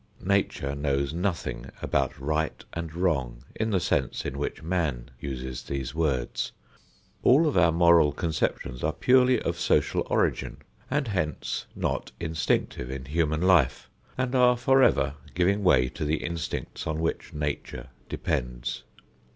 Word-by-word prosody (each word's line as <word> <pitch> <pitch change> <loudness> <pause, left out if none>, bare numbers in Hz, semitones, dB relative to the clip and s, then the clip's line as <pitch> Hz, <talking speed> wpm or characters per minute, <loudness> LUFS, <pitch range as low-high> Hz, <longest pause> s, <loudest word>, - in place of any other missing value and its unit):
Nature 95 -8 +1
knows 70 0 -1
nothing 85 -9 -2
about 70 -2 -1
right 75 +3 -2
and 85 -1 -5
wrong 70 -10 0
in 110 0 -1
the 100 -4 +2
sense - - -1
in 65 - -3
which 70 +2 -4
man 80 -9 -1
uses 65 -2 -5
these 65 -2 -4
words. 70 -7 -1 0.7
All 145 +6 +5
of 150 - +1
our 85 -2 +5
moral 85 -2 +5
conceptions 70 -5 -2
are - - +1
purely 125 -1 +4
of - - -2
social - - +2
origin - - 0 0.3
and 140 -3 0
hence 80 -6 -2
not - - -2
instinctive 80 -6 -1
in 65 0 -5
human 80 +2 0
life, 85 -9 +3 0.3
and 130 0 -1
are 125 -1 +5
forever 120 - +4 0.2
giving 95 +4 +2
way 65 -9 +5
to - - -6
the 75 +1 0
instincts 85 -2 -4
on 80 0 -1
which 80 0 -2
Nature 75 -4 -4 0.2
depends. - - -2
80 Hz, 140 wpm, -27 LUFS, 70-95 Hz, 0.7 s, All